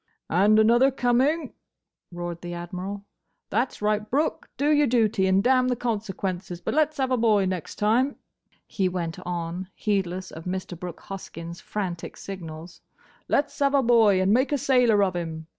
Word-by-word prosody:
"And 205 Hz, +5 st, +4 dB
another 235 Hz, +5 st, +5 dB
coming!" 265 Hz, +4 st, +1 dB, 0.6 s
roared 175 Hz, -1 st, -5 dB
the 175 Hz, 0 st, -6 dB
Admiral. 185 Hz, +4 st, -6 dB, 0.5 s
"That's 235 Hz, 0 st, -1 dB
right, 210 Hz, 0 st, 0 dB
Brooke! 295 Hz, +5 st, -1 dB
Do 290 Hz, +2 st, +2 dB
your 295 Hz, -1 st, +4 dB
duty, 220 Hz, -5 st, +2 dB
and 190 Hz, +1 st, +3 dB
damn 255 Hz, 0 st, +4 dB
the 250 Hz, -, +1 dB
consequences!—But 195 Hz, -6 st, -3 dB
let's 310 Hz, +1 st, +2 dB
have 265 Hz, -1 st, 0 dB
a 255 Hz, -, +3 dB
boy 215 Hz, -4 st, +3 dB
next 185 Hz, -3 st, -4 dB
time," 240 Hz, +7 st, +2 dB, 0.5 s
he 190 Hz, -2 st, -1 dB
went 170 Hz, -3 st, -4 dB
on, 175 Hz, +1 st, -4 dB
heedless 190 Hz, -3 st, -2 dB
of 160 Hz, -, -10 dB
Mr. 185 Hz, 0 st, -4 dB
Brooke 175 Hz, 0 st, -8 dB
Hoskyn's 170 Hz, -3 st, -8 dB
frantic 185 Hz, -5 st, -5 dB
signals, 170 Hz, -3 st, -8 dB, 0.5 s
"let 290 Hz, 0 st, +1 dB
's -, -, -15 dB
have 280 Hz, 0 st, +3 dB
a 275 Hz, -, +4 dB
boy, 225 Hz, -5 st, +5 dB
and 190 Hz, +2 st, +3 dB
make 260 Hz, +5 st, +2 dB
a 290 Hz, -, +2 dB
sailor 245 Hz, -6 st, +3 dB
of 185 Hz, -2 st, 0 dB
him! 160 Hz, -2 st, -4 dB
205 Hz, 165 wpm, -25 LUFS, 180-245 Hz, 0.6 s, another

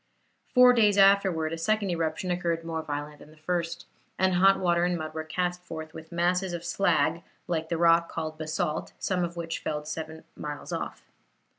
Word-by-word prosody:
Four 250 Hz, 0 st, +8 dB
days 210 Hz, -4 st, +4 dB
afterwards 195 Hz, -5 st, +4 dB
a -, -, -3 dB
second 210 Hz, +2 st, +1 dB
eruption 165 Hz, +2 st, -1 dB
occurred 170 Hz, -2 st, -1 dB
more 165 Hz, -1 st, -3 dB
violent 145 Hz, 0 st, -5 dB
than -, -, -14 dB
the 155 Hz, -, -18 dB
first, 170 Hz, +1 st, -3 dB, 0.3 s
and 190 Hz, 0 st, +2 dB
hot 195 Hz, +2 st, +5 dB
water 175 Hz, -2 st, +2 dB
and 175 Hz, 0 st, +1 dB
mud 155 Hz, -1 st, -5 dB
were 160 Hz, 0 st, -4 dB
cast 180 Hz, +2 st, -2 dB
forth 160 Hz, -2 st, -8 dB
with 160 Hz, +1 st, -11 dB
masses 180 Hz, +2 st, 0 dB
of 170 Hz, 0 st, -5 dB
slag 170 Hz, -3 st, +1 dB, 0.3 s
like 160 Hz, -2 st, -2 dB
the 170 Hz, -, 0 dB
rock 170 Hz, 0 st, +4 dB
called 155 Hz, 0 st, -4 dB
basalt 155 Hz, 0 st, -3 dB
some 180 Hz, -2 st, -1 dB
of 170 Hz, 0 st, -4 dB
which 165 Hz, -1 st, -3 dB
fell 150 Hz, -1 st, -3 dB
seven 160 Hz, +1 st, -6 dB
miles 145 Hz, -1 st, -6 dB
off. -, -, -5 dB
170 Hz, 185 wpm, -27 LUFS, 160-180 Hz, 0.3 s, Four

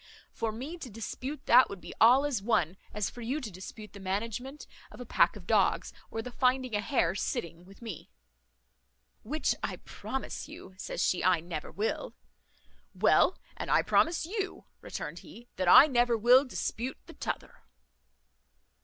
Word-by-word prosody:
For 225 Hz, -1 st, -2 dB
me 275 Hz, +10 st, -7 dB
to 265 Hz, -, -7 dB
dispute 245 Hz, +7 st, -6 dB
that 250 Hz, +2 st, +7 dB
would 200 Hz, -, -7 dB
be -, -, -9 dB
all 250 Hz, +5 st, +7 dB
as 265 Hz, -8 st, -1 dB
one 195 Hz, -6 st, +1 dB, 0.2 s
as 210 Hz, -2 st, -1 dB
for 245 Hz, -, -9 dB
you 255 Hz, +6 st, -2 dB
to 235 Hz, -8 st, -6 dB
dispute 190 Hz, +3 st, -10 dB
the 200 Hz, -, -10 dB
management 230 Hz, +9 st, -4 dB, 0.2 s
of -, -, -14 dB
a -, -, -7 dB
pack -, -, +3 dB
of -, -, -11 dB
dogs, -, -, +2 dB, 0.2 s
or 225 Hz, -, -4 dB
the 250 Hz, -, -7 dB
finding 255 Hz, 0 st, +1 dB
a 205 Hz, -, +1 dB
hare 215 Hz, -, +1 dB
sitting, 170 Hz, -3 st, -4 dB
with 195 Hz, +5 st, -16 dB
me." 215 Hz, -9 st, -7 dB, 1.1 s
"Which 300 Hz, +8 st, 0 dB
I -, -, -2 dB
promise 265 Hz, -, -6 dB
you," 185 Hz, -, -11 dB
says 185 Hz, -, -3 dB
she, 180 Hz, -, +1 dB
"I 185 Hz, -2 st, +4 dB
never 165 Hz, -2 st, -6 dB
will." 215 Hz, +3 st, -3 dB, 0.8 s
"Well, -, -, +4 dB, 0.2 s
and -, -, -5 dB
I -, -, +4 dB
promise 330 Hz, 0 st, +2 dB
you," 390 Hz, +1 st, -4 dB, 0.2 s
returned -, -, -6 dB
he, 240 Hz, +1 st, -14 dB
"that 185 Hz, -1 st, -1 dB
I 180 Hz, -, +10 dB
never 240 Hz, -4 st, +2 dB
will 250 Hz, +5 st, +6 dB
dispute 255 Hz, 0 st, -3 dB
the -, -, -12 dB
t'other." -, -, -5 dB
230 Hz, 170 wpm, -30 LUFS, 195-260 Hz, 1.1 s, I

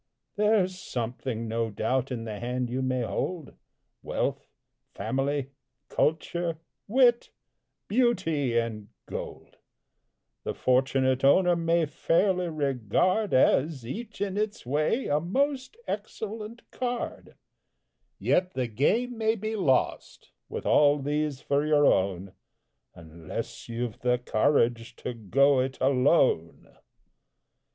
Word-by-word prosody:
There's 205 Hz, -3 st, +2 dB
something, 120 Hz, -3 st, -4 dB
no 115 Hz, 0 st, -1 dB
doubt, 125 Hz, +5 st, -1 dB
in 120 Hz, -3 st, -3 dB
the 110 Hz, -2 st, -6 dB
hand 125 Hz, 0 st, -2 dB
you 130 Hz, +2 st, -1 dB
may 130 Hz, -1 st, 0 dB
hold: 165 Hz, +6 st, -3 dB, 0.5 s
Wealth, -, -, -2 dB, 0.5 s
family, 135 Hz, +5 st, -1 dB, 0.4 s
culture, 165 Hz, +1 st, 0 dB, 0.3 s
wit, 240 Hz, +1 st, +4 dB, 0.6 s
beauty 180 Hz, -, +1 dB
and 110 Hz, -3 st, -2 dB, 0.2 s
gold, -, -, -8 dB, 0.9 s
The -, -, -3 dB
fortunate 130 Hz, 0 st, +2 dB
owner 175 Hz, +6 st, +5 dB
may 165 Hz, 0 st, +2 dB
fairly 175 Hz, +4 st, +1 dB
regard 155 Hz, -, 0 dB
As, 130 Hz, 0 st, +3 dB
each 215 Hz, -, -7 dB
in 200 Hz, -1 st, -1 dB
its 210 Hz, -6 st, -2 dB
way, 150 Hz, -, 0 dB
a 145 Hz, +1 st, +1 dB
most 270 Hz, -, -1 dB
excellent 215 Hz, +2 st, -5 dB
card; 245 Hz, -1 st, -4 dB, 0.8 s
Yet 180 Hz, 0 st, +1 dB
the 130 Hz, -1 st, 0 dB
game 220 Hz, -, 0 dB
may 220 Hz, 0 st, +2 dB
be 220 Hz, +1 st, -3 dB
lost, 140 Hz, -11 st, 0 dB, 0.2 s
with -, -, -5 dB
all 145 Hz, 0 st, +5 dB
these 145 Hz, 0 st, -2 dB
for 145 Hz, -1 st, +1 dB
your 150 Hz, -1 st, +3 dB
own, 95 Hz, -3 st, +1 dB, 0.6 s
Unless 80 Hz, +4 st, -7 dB
you've 115 Hz, -1 st, -4 dB
the 125 Hz, 0 st, +2 dB
courage 120 Hz, -1 st, +1 dB
to 125 Hz, -, -5 dB
"go 135 Hz, +5 st, +3 dB
it 130 Hz, +1 st, -1 dB
alone!" 130 Hz, -, +2 dB
145 Hz, 110 wpm, -27 LUFS, 125-185 Hz, 0.9 s, owner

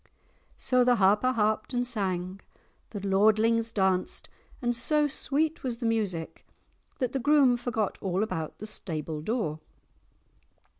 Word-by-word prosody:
'" -, -, -38 dB
So 255 Hz, -1 st, +2 dB
the 245 Hz, 0 st, +4 dB
Harper 210 Hz, +4 st, +3 dB
harped 215 Hz, +1 st, 0 dB
and 245 Hz, 0 st, +1 dB
sang, 190 Hz, -5 st, -3 dB, 0.5 s
the 205 Hz, -, -6 dB
lordlings 220 Hz, +3 st, +3 dB
danced, 190 Hz, -2 st, -1 dB, 0.3 s
and 240 Hz, -2 st, 0 dB
so 295 Hz, +5 st, +2 dB
sweet 305 Hz, +3 st, -1 dB
was 245 Hz, -3 st, -3 dB
the 235 Hz, -, -5 dB
music 205 Hz, -8 st, -2 dB, 0.5 s
that 255 Hz, -3 st, -1 dB
the 270 Hz, -, 0 dB
groom 280 Hz, -2 st, +4 dB
forgot 235 Hz, -4 st, -2 dB
all 190 Hz, +1 st, 0 dB
about 175 Hz, -7 st, -4 dB
the 215 Hz, -, -7 dB
stable 160 Hz, -7 st, -5 dB
door. 185 Hz, -5 st, -2 dB
220 Hz, 140 wpm, -28 LUFS, 190-245 Hz, 0.5 s, the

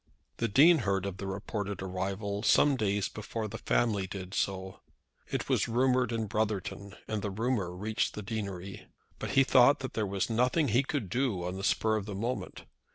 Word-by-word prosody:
The 115 Hz, -, 0 dB
Dean 155 Hz, +10 st, +6 dB
heard 100 Hz, -4 st, 0 dB
of 100 Hz, -1 st, -4 dB
the 100 Hz, -, -5 dB
reported 100 Hz, 0 st, -4 dB
arrival 95 Hz, +2 st, -3 dB
some 140 Hz, +5 st, +4 dB
days 105 Hz, -4 st, 0 dB
before 110 Hz, +1 st, -5 dB
the 110 Hz, +2 st, -7 dB
family 105 Hz, -5 st, +1 dB
did 95 Hz, -1 st, -7 dB
so. 95 Hz, -1 st, -2 dB, 0.5 s
It -, -, -3 dB
was -, -, +2 dB
rumoured 125 Hz, +1 st, +2 dB
in 115 Hz, -1 st, -1 dB
Brotherton, 100 Hz, -2 st, -2 dB
and 110 Hz, -1 st, -2 dB
the 100 Hz, -, -2 dB
rumour 105 Hz, -2 st, -1 dB
reached 105 Hz, +4 st, -1 dB
the 105 Hz, -, -5 dB
deanery. 100 Hz, -2 st, -5 dB, 0.3 s
But -, -, -4 dB
he 135 Hz, -, +8 dB
thought 130 Hz, +1 st, +6 dB
that 130 Hz, -, -5 dB
there 110 Hz, -2 st, -1 dB
was 95 Hz, -1 st, -1 dB
nothing 125 Hz, +7 st, +2 dB
that 130 Hz, -, -1 dB
he 120 Hz, -, +4 dB
could 140 Hz, -5 st, -3 dB
do 110 Hz, -3 st, -1 dB
on 90 Hz, +1 st, -3 dB
the 95 Hz, -, -6 dB
spur 110 Hz, +1 st, +2 dB
of 105 Hz, -1 st, -5 dB
the 100 Hz, -, -5 dB
moment. 120 Hz, +6 st, -4 dB
105 Hz, 195 wpm, -30 LUFS, 95-120 Hz, 0.5 s, he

